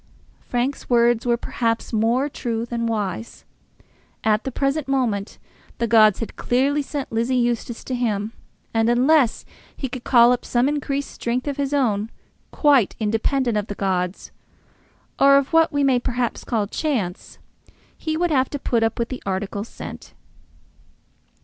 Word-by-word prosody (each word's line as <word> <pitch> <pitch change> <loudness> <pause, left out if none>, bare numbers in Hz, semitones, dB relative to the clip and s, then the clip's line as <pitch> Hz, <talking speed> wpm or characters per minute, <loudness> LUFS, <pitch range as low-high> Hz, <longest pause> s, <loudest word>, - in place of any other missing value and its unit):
Frank's 250 +3 -3
words 240 -1 +3
were 240 0 +3
perhaps 230 0 -2
more 230 +5 +2
true 230 -5 -3
than 235 -1 -2
wise. 220 0 -4 0.8
At 215 0 +2
the 265 - -2
present 275 +3 -1
moment 235 -7 -1 0.4
the 235 - 0
gods 215 -2 +5
had 225 - -5
clearly 275 +4 +1
sent 285 0 -5
Lizzie 230 +3 0
Eustace 240 -1 -1
to 260 - -5
him, 220 -3 -1 0.4
and 225 0 +2
unless 255 +1 +3 0.3
he 270 - -3
could 250 -1 -7
call 240 -1 +6
up 250 - 0
some 245 +2 +1
increased 285 -1 -2
strength 245 +3 -3
of 280 - -2
his 280 -1 -1
own, 225 -7 +1 0.4
quite 280 - +3
independent 225 +2 0
of 205 - -5
the 205 - -5
gods, 185 -2 -2 0.9
or 275 0 +7
of 280 +3 -1
what 325 -1 +5
we 285 -1 +1
may 265 -3 +3
perhaps 245 -1 -2
call 220 -4 -1
chance, 210 - -3 0.6
he 315 0 -3
would 350 0 +1
have 265 -3 +2
to 285 - -4
put 240 -4 0
up 225 0 0
with 235 0 -2
the 255 - -6
article 195 +1 -3
sent. 230 - -10
240 Hz, 155 wpm, -22 LUFS, 225-275 Hz, 0.9 s, or